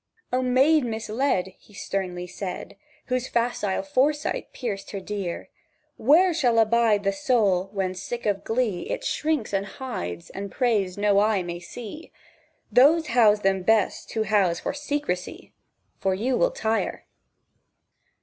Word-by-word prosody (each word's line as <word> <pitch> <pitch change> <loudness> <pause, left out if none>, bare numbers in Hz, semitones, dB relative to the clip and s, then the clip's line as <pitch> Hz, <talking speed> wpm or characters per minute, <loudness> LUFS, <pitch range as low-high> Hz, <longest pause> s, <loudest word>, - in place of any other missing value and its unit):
"O 255 - +2
maid 265 +4 +4
misled!" 220 -3 -1
He 210 - -20
sternly 180 -3 -3
said, 180 +1 -6 0.3
Whose 255 0 -1
facile 235 -3 -1
foresight 290 +1 0
pierced 210 -6 -5
her 200 - -5
dire; 195 -3 -5 0.5
"Where 340 +8 +4
shall 245 -8 +2
abide 225 -2 +3
the 195 0 +1
soul 205 -9 +1
when, 190 -2 -2
sick 215 +6 -6
of 205 -2 0
glee, 225 -6 -1
It - - -3
shrinks, 305 - -1
and 195 0 +1
hides, 90 - -6
and 195 0 -6
prays 210 -7 0
no 205 -1 +3
eye 210 -2 +2
may 175 0 -5
see? 235 - -9 0.6
Those 305 +5 +5
house 220 -3 +4
them 195 -1 +1
best 215 +1 +1
who 220 - +1
house 195 -5 +2
for - - -2
secrecy, 285 -11 -4 0.5
For 190 -1 +1
you 245 +7 0
will - - +3
tire." 225 - -2
220 Hz, 140 wpm, -25 LUFS, 195-255 Hz, 0.6 s, Those